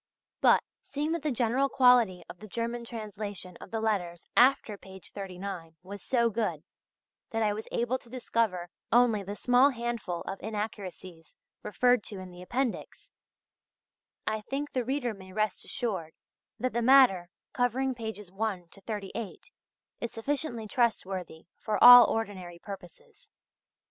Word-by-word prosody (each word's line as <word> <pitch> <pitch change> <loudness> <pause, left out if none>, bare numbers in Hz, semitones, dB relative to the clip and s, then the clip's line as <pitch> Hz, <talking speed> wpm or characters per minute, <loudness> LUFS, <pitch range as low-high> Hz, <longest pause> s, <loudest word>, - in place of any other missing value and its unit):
But, - - +5 0.2
seeing 295 +2 -3
that 335 -1 -1
the 305 - -1
general 250 +3 +1
quality 245 -9 +4
of 180 - -11
the 215 - -10
German 235 +3 -3
translation 205 -5 -6
of - - -10
the 225 - -2
letters 185 -6 -2
after 250 -4 +4
page 190 -1 -13
39 185 -4 -7
was 200 +1 -8
so 235 -3 +1
good 220 0 -2 0.7
that 225 0 -1
I 210 -1 +2
was 215 +1 -6
able 240 +2 0
to 235 - -18
discover 225 -8 -1 0.2
only 235 -3 +4
the 200 +1 -6
small 250 +5 +4
handful 235 -8 -3
of 195 - -6
inaccuracies 195 -6 -6 0.2
referred 245 +3 +2
to 205 - -6
in 185 -1 -9
the 180 0 -12
appendix, 245 +6 -3 1.1
I 215 0 -1
think 275 +6 -4
the 255 - -1
reader 255 -1 -1
may 190 -2 -13
rest 215 -1 -1
assured 190 -9 -3 0.5
that 255 0 -1
the 235 - 0
matter 235 -9 +5 0.2
covering 255 +2 +1
pages 220 -5 -7
1 195 -4 -3
to 195 - -16
38 210 - -6 0.5
is 235 - -4
sufficiently 240 -1 -2
trustworthy 190 -8 -1
for 215 - -1
all 245 0 +12
ordinary 190 -6 -3
purposes. 200 - -12
220 Hz, 145 wpm, -29 LUFS, 190-245 Hz, 1.1 s, all